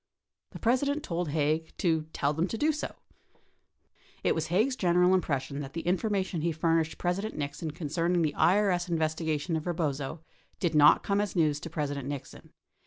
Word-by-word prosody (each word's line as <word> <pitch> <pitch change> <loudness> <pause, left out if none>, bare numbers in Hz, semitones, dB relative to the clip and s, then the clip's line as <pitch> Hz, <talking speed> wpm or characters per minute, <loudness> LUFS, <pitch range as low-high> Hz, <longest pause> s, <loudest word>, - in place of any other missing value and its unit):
The - - -9
President 280 +5 +1
told 170 -1 -2
Haig 155 +2 -1
to 160 -3 +1
"tell 145 -1 0
them 165 +4 0
to 225 - -4
do 305 +6 +3
so." 305 - -5 1.3
It - - +3
was 160 -1 -2
Haig's 215 +11 +2
general 180 -3 +3
impression 140 -6 -1
that 140 -1 -6
the 165 - -3
information 190 -2 0
he 170 +2 +1
furnished 165 0 +1
President 195 +5 -2
Nixon 150 +2 -4
con 150 +1 -5
cerning 170 +2 +1
the 150 -2 0
IES 185 -2 +2
investigation 160 0 -1
of 155 - -3
Eebozo 155 -3 -2 0.4
did 170 -3 0
not 150 -1 +6
come 200 0 +1
as 205 - -3
news 155 -4 +2
to 165 - -7
President 145 -4 -3
Nixon. 145 -2 -7
165 Hz, 175 wpm, -29 LUFS, 150-185 Hz, 1.3 s, not